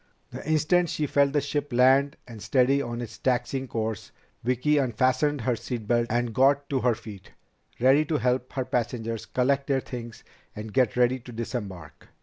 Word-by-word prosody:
The - - -7
instant 160 +3 +2
she 150 - -1
felt 140 0 +2
the 145 - +2
ship 145 0 -3
land 130 +3 +4
and 115 -3 -10
steady 130 +6 +2
on 120 -2 -4
its 115 -2 -8
taxiing 130 +1 -1
course, 110 -3 -4 0.3
Vicki 130 +5 +2
unfastened 130 +3 +1
her 120 +1 0
seat 115 -1 -5
belt 120 0 +2
and 120 0 -1
got 140 +3 +3
to 135 - +1
her 125 -2 +2
feet, 105 -4 -12 0.5
ready 135 +5 +5
to 155 0 0
help 125 -1 0
her 130 -2 -2
passengers 115 -2 -3
collect 135 +4 +1
their 135 -1 +2
things 120 -3 -8 0.3
and 105 0 -7
get 125 -3 +2
ready 125 +1 +3
to 125 0 -12
disembark. 100 - -6
125 Hz, 175 wpm, -26 LUFS, 115-140 Hz, 0.5 s, ready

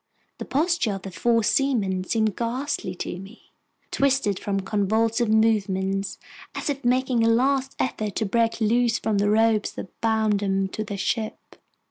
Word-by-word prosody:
The - - -5
postures 305 - +1
of 195 - -7
the 195 - -7
four 230 +6 +1
seamen 210 -8 +1
seemed 220 0 0
ghastly 240 -5 -3
to 175 - -5
me, 195 +5 -14 0.4
twisted 265 -8 +1
from 195 -1 -2
convulsive 220 +3 +1
movements, 195 -3 +1 0.4
as - - -1
if 275 0 -6
making 250 -1 +2
a 225 - +4
last 265 +3 +1
effort 215 -5 -2
to 220 - 0
break 230 +3 +1
loose 230 +1 +2
from 210 -2 0
the 205 +1 +2
ropes 220 0 +2
that 185 - -10
bound 220 -2 +2
them 195 -1 0
to 215 - -4
their 205 -1 -5
ship. 220 +2 -2
220 Hz, 160 wpm, -24 LUFS, 200-240 Hz, 0.4 s, a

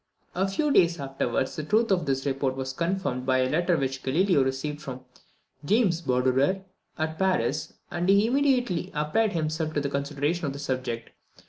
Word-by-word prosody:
A 190 +2 +1
few 285 +10 0
days 170 - +4
afterwards, 135 -2 -2
the 155 - -4
truth 215 +7 +2
of 175 -6 +1
this 135 0 0
report 135 -1 0
was 130 0 -4
confirmed 170 -5 -1
by 130 0 +2
a 130 0 +2
letter 175 +2 +2
which 135 -1 -2
Galileo 160 +2 +3
received 135 +3 -3
from 130 -3 -7 0.6
James 190 -1 +2
Badorere 130 +7 +1 0.3
at 155 0 -3
Paris, 190 -1 0 0.2
and 175 +1 -1
he 200 +2 +5
immediately 245 -8 +1
applied 175 +9 +1
himself 155 -1 -1
to - - +3
the 140 -1 -2
consideration 145 +4 -1
of 135 - -3
the - - -7
subject. 130 -4 -3
155 Hz, 170 wpm, -26 LUFS, 135-185 Hz, 0.6 s, he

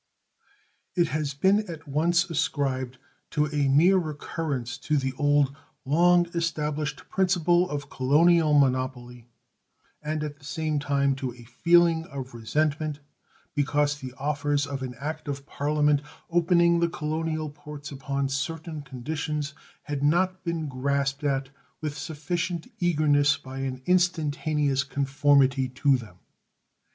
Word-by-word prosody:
It 170 -3 +2
has 150 -3 -2
been 190 +8 +4
at 160 -2 -8
once 170 +5 +2
ascribed 135 -6 -1 0.3
to 150 -1 +1
a 145 -2 0
mere 165 +8 +5
recurrence 145 -5 -4
to 150 +1 0
the 135 -1 -1
old, 145 -1 +2 0.3
long 175 +5 +4
established 155 -3 -2
principle 180 -2 +2
of 145 -1 -5
colonial 155 +3 +4
monopoly 125 -3 0 0.7
and 155 0 -2
at 145 -1 -6
the - - -23
same 155 +1 -2
time 140 -1 +1
to 130 -3 -4
a 120 - -13
feeling 165 +6 +3
of 135 -5 -7
resentment 150 +6 -1 0.5
because 145 0 +1
the 130 -2 -7
offers 145 0 0
of 140 -1 -5
an 125 -1 -5
act 155 +3 -5
of 140 -1 -4
Parliament 150 0 +1 0.3
opening 170 0 +4
the 170 0 +2
colonial 155 0 -2
ports 145 -1 -9
upon 140 0 -2
certain 155 +3 -4
conditions 150 +3 -4 0.3
had 145 -2 -4
not 185 +5 +2
been 170 -3 -2
grasped 140 +1 -1
at 135 -2 0 0.3
with 150 -2 -4
sufficient 165 +2 -3
eagerness 145 -5 +3
by 135 -1 -8
an 130 -1 -4
instantaneous 155 -5 +1
conformity 140 -1 +2
to 135 +2 +2
them. 110 -8 -7
145 Hz, 130 wpm, -26 LUFS, 140-160 Hz, 0.7 s, mere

